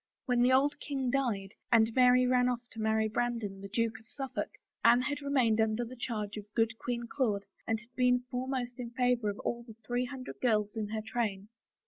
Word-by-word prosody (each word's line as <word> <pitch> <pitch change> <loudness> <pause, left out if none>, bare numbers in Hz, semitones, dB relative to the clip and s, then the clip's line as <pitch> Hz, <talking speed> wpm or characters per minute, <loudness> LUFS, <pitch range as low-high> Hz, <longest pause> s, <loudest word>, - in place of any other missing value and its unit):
When 245 -2 +2
the 250 +1 +5
old 280 +3 +3
king 270 -4 -2
died 215 -8 -1 0.2
and 225 -1 +5
Mary 250 0 +6
ran 250 0 +3
oflF 240 -1 -2
to 225 - -6
marry 220 0 +2
Bran 240 +2 0
don, 195 -3 -6
the 200 - -7
Duke 225 +1 0
of 225 - -22
SuflFolk, 270 0 -4 0.3
Anne 240 +1 +6
had 290 +2 -2
remained 255 -6 +2
under 220 +2 +1
the 250 +2 -9
charge 215 -4 -4
of 210 0 -9
good 225 -1 +2
Queen 240 -1 -2
Claude 220 -6 -1 0.2
and 225 -1 +1
had 235 +3 -17
been 250 0 +3
foremost 250 -1 -3
in 240 -1 -4
favor 245 -3 +1
of 200 - -4
all 235 - -2
the 230 -2 -12
three 245 +2 0
hundred 255 0 -8
girls 215 -3 +2
in 215 -2 -2
her 215 +1 -3
train. 210 -4 -2
240 Hz, 210 wpm, -31 LUFS, 220-250 Hz, 0.3 s, Mary